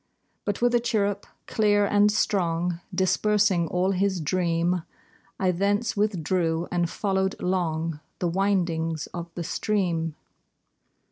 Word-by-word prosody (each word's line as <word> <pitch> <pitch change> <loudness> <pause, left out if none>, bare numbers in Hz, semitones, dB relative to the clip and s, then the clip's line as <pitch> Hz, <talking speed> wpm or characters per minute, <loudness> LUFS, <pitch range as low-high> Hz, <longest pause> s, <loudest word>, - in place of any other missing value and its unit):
But 205 +3 -2
with 245 0 +4
a 240 - +5
chirrup 205 -4 -1 0.2
clear 205 -2 +2
and 205 +1 +4
strong 175 -4 0
Dispersing 190 -1 +2
all 180 +3 +1
his 190 0 +1
dream, 170 +1 0 0.6
I 185 -1 +2
thence 205 +6 0
withdrew, 175 -4 0
and 175 -1 +1
followed 190 -1 -1
long 165 -4 -1 0.2
The 175 - -1
windings 170 -4 0
of 170 -1 -5
the 175 - -3
stream. 170 -4 -1
185 Hz, 120 wpm, -26 LUFS, 170-205 Hz, 0.6 s, a